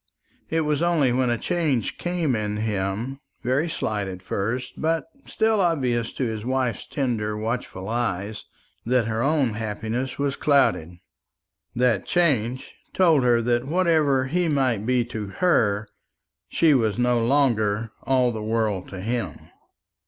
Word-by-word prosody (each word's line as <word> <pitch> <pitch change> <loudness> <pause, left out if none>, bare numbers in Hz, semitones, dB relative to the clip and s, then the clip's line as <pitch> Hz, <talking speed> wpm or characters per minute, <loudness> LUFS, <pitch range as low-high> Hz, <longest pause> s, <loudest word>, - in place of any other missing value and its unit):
It 160 0 +1
was 150 -1 0
only 165 -7 +3
when 125 0 +1
a 120 - +1
change 145 - -1
came 175 -7 0
in 105 -1 -2
him 105 +5 -2 0.2
very 135 +7 +1
slight 105 -9 -2
at 95 -1 -7
first, 115 +7 -3
but 165 +1 0 0.2
still 220 -2 +1
obvious 130 -10 0
to - - -3
his 110 -3 -3
wife's 125 -3 -1
tender 110 -6 -2
watchful 110 -4 -4
eyes 110 -3 -2 0.4
that 125 0 +2
her 110 0 -1
own 140 -4 +2
happiness 110 +4 -3
was 140 -1 -1
clouded. 90 - +2 0.8
That 120 -5 +1
change 130 -8 +1 0.2
told 165 -6 +5
her 120 -2 +3
that 120 +2 0
whatever 155 -6 +2
he 175 +6 0
might 130 -8 +1
be 125 -2 +2
to 110 -3 -5
her, 110 - +2 0.6
she 160 -3 +4
was 115 -5 +1
no 120 -1 +2
longer 115 -5 +1
all 130 -2 +2
the 110 -2 -5
world 110 -3 -1
to 95 -1 -7
him. 115 +3 -4
120 Hz, 145 wpm, -24 LUFS, 110-140 Hz, 0.8 s, told